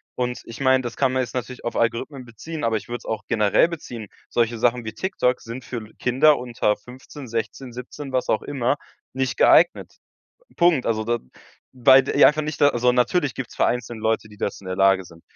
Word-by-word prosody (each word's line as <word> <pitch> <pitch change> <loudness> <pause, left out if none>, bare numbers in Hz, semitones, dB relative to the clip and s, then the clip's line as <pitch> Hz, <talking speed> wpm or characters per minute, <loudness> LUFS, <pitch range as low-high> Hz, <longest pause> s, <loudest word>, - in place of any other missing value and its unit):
Und 125 0 -2
ich 115 - -10
meine, 130 -1 +3
das 120 - -5
kann 135 -2 +2
man 130 - +1
jetzt 120 - -8
natürlich 125 0 -5
auf 120 - -3
Algorithmen 120 +4 -1
beziehen, 150 +7 -8
aber 115 -1 +1
ich - - -9
würde 120 - -4
es - - -18
auch 110 -2 -3
generell 105 +5 +3
beziehen. 125 -9 -7 0.2
Solche 115 -1 0
Sachen 120 0 +1
wie 110 - -5
TikTok 130 -10 -1
sind 120 +2 -8
für 120 -3 -5
Kinder 135 +4 +4
unter 120 -4 -1
15, 130 +2 -12
16,, 115 +2 -4
17, 130 +3 -8
was 130 -1 -1
auch - - +1
immer 135 -2 0 0.4
nicht 130 -1 -2
geeignet. - - +4 0.6
Punkt. 170 -7 +3
Also, 110 -1 0
da 120 +1 0 0.6
weil 130 +1 +6
die 140 +2 +3
einfach 150 +1 +5
nicht 150 -1 -5
da 145 - +8
also, 125 0 +2
natürlich 135 +4 +1
gibt 130 -3 -6
es - - -14
vereinzelt 120 -1 -1
Leute, 110 0 0
die 105 -1 -16
dazu 100 - -4
in - - -7
der 95 - -3
Lage 95 -1 +4
sind. 85 -1 -16
125 Hz, 210 wpm, -23 LUFS, 115-130 Hz, 0.6 s, da